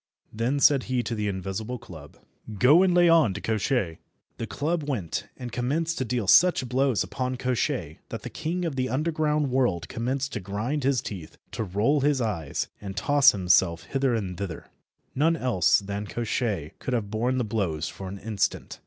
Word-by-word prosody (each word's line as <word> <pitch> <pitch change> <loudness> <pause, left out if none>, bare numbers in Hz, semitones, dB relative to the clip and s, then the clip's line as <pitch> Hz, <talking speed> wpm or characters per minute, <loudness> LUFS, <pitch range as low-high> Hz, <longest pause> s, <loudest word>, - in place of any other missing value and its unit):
Then 120 +6 0
said 140 -1 +5
he 125 -1 0
to 115 - -3
the 105 -2 -2
invisible 100 +5 -4
club— 80 -9 -12 0.4
"Go, 145 - +6
and 190 -1 +4
lay 175 0 +5
on 160 - +4
to - - -3
Koshchei." 110 -5 -1 0.4
The 115 - -3
club 160 +7 -1
went 100 - -2
and 125 -2 -6
commenced 150 +8 -1
to 130 - -1
deal 120 -2 -1
such 175 - +5
blows 130 -2 +1
upon 130 -1 -3
Koshchei 125 -1 -2
that - - -6
the - - -6
king 170 +3 -3
of 160 -5 -2
the 130 -1 -1
underground 150 0 0
world 120 -10 +1
commenced 130 +4 -2
to 110 - -2
grind 105 +9 -3
his 135 -1 +1
teeth, 90 -7 -8
to - - -3
roll 110 +10 +1
his 145 -1 +2
eyes, 95 - -2
and 100 -1 -7
toss 145 +6 +5
himself 90 -3 +2
hither 135 -3 0
and 95 -5 -4
thither. 95 -5 -5 0.5
None 160 +5 +2
else 120 - +3
than 100 +1 -4
Koshchei 105 - -2
could 130 - -2
have 105 -4 -3
borne 120 +4 0
the 125 - +1
blows 95 -8 -2
for 95 - -7
an 95 +2 -6
instant. 105 -1 -2
120 Hz, 185 wpm, -26 LUFS, 100-140 Hz, 0.5 s, Go